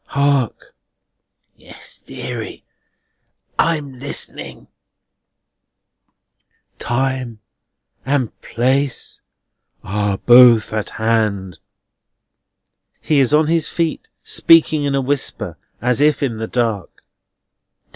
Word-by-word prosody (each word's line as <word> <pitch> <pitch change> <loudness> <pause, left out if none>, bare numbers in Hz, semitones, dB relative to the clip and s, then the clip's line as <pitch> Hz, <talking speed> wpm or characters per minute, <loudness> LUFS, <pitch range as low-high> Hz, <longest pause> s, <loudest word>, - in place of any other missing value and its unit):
Hark!" 140 -4 0 0.8
"Yes, - - -13
deary. - - -7 1.0
I'm 145 -6 0
listening." 140 +2 -6 2.1
"Time 130 -1 -2 0.7
and 135 -4 -1
place 130 +3 -1 0.6
are 100 0 -1
both 120 -2 +6
at 110 -1 -2
hand." 105 -6 -1 1.4
He 150 -2 +1
is 130 -3 +3
on 155 +1 +4
his 165 0 +1
feet, 165 -2 -2
speaking 160 -2 +4
in 140 -1 0
a 135 - +1
whisper, 130 - -2 0.2
and 120 - -2
as 125 - +1
if 150 0 +3
in 120 -5 -2
the 110 0 -4
dark. 115 -6 -3
130 Hz, 90 wpm, -18 LUFS, 110-145 Hz, 2.1 s, both